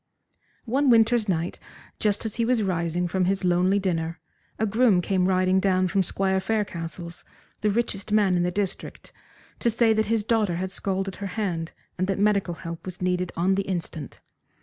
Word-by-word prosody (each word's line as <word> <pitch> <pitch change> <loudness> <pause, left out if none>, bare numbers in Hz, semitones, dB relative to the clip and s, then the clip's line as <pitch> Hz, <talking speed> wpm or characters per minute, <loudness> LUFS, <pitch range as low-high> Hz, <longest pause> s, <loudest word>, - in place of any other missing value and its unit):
One 265 +4 +2
winter's 230 -2 +4
night, 170 -1 -1 0.4
just 210 0 0
as 220 - -4
he 230 - +1
was 235 -1 +2
rising 175 -1 -1
from 185 +1 0
his 190 0 0
lonely 180 +2 +3
dinner, 170 -4 -2 0.4
a 220 - +1
groom 220 -2 +3
came 185 0 +1
riding 185 0 +3
down 185 -1 +2
from 195 +2 +2
Squire 190 +1 0
Faircastle's, 175 -4 -4 0.4
the 210 - +1
richest 210 -1 -1
man 205 -3 +3
in 175 - +2
the 175 - +1
district, 195 +1 -4 0.5
to 235 - +2
say 230 0 +3
that 220 0 +1
his 225 -1 +1
daughter 215 -5 +1
had 185 +2 -3
scalded 195 -1 -2
her 200 - -4
hand, 170 -6 -2 0.3
and 185 - +1
that 195 - 0
medical 200 -4 +1
help 165 0 -7
was 185 0 -7
needed 180 -1 -1
on 180 +3 +2
the 195 - +1
instant. 170 -5 -4
190 Hz, 180 wpm, -25 LUFS, 180-210 Hz, 0.5 s, winter's